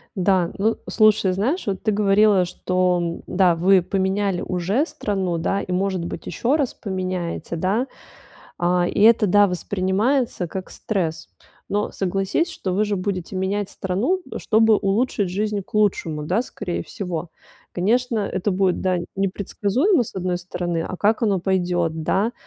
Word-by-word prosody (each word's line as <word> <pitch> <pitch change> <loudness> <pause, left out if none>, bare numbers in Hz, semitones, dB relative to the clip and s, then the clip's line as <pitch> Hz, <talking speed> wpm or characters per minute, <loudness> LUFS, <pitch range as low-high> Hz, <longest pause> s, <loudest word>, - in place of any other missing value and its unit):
Да. 185 -2 +2
Ну, 220 +3 +1
слушай, 215 -3 +4
знаешь, 240 - -1
вот 195 -2 -2
ты 215 - +2
говорила, 205 -1 +4
что, 180 -1 0
да, 180 -2 +3
вы 185 +3 +4
поменяли 190 +1 0
уже 190 - 0
страну, 195 - -2
да, 195 +4 0
и, - - -6
может 185 -1 0
быть, 170 - -6
ещё 240 - 0
раз 285 -5 0
поменяете, 185 -4 -4
да. 195 +10 0 0.7
А, 175 0 +2
и - - -2
это, 225 0 +6
да, 205 +2 +5
воспринимается 195 - 0
как 185 +2 -6
стресс. 175 - -3 0.4
Но 205 +1 0
согласись, 195 - -1
что 200 - -4
вы 205 +4 +2
же 205 -1 -1
будете 185 -1 -3
менять 195 +2 -1
страну, 205 - -1 0.2
чтобы 220 -1 +4
улучшить 205 0 0
жизнь 210 +2 -1
к 195 - -16
лучшему, 180 -7 +1
да, 180 +9 0
скорее 180 -7 -4
всего? 180 -3 -5 0.4
Конечно, 230 +5 +1
это 200 0 -1
будет, 185 -1 +1
да, 185 -1 +1 0.2
непредсказуемо 200 - +1
с 230 - -8
одной 180 -1 -1
стороны, 175 -1 -3
а 185 - -5
как 215 +6 +1
оно 205 -4 +2
пойдет, 175 -3 0
да, 205 +8 +1
195 Hz, 150 wpm, -22 LUFS, 180-210 Hz, 0.7 s, это